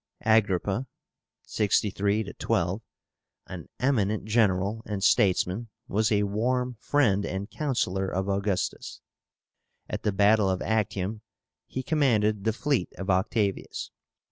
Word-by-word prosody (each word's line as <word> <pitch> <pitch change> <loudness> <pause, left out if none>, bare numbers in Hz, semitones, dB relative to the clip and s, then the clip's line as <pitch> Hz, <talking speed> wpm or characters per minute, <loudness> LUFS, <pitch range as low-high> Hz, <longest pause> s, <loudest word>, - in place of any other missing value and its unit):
AGRIPPA 110 +2 +2 0.6
(63 100 0 0
12), 90 +5 0 0.6
an - - -9
eminent 110 -6 +1
general 105 -1 +1
and 100 -2 -3
statesman, 95 +3 +2 0.2
was 110 +2 +1
a 105 -1 +3
warm 125 +5 0
friend 110 -9 +2
and 100 +2 -4
counsellor 95 -10 -1
of 95 +1 -2
Augustus. 100 -1 -2 0.9
At - - -4
the 105 - 0
battle 100 +1 +4
of 95 -1 0
Actium 105 -1 -1 0.5
he 130 - -4
commanded 110 -9 +1
the 110 - +3
fleet 140 - -1
of 95 0 -1
Octavius. 100 +2 -1
105 Hz, 115 wpm, -27 LUFS, 95-110 Hz, 0.9 s, battle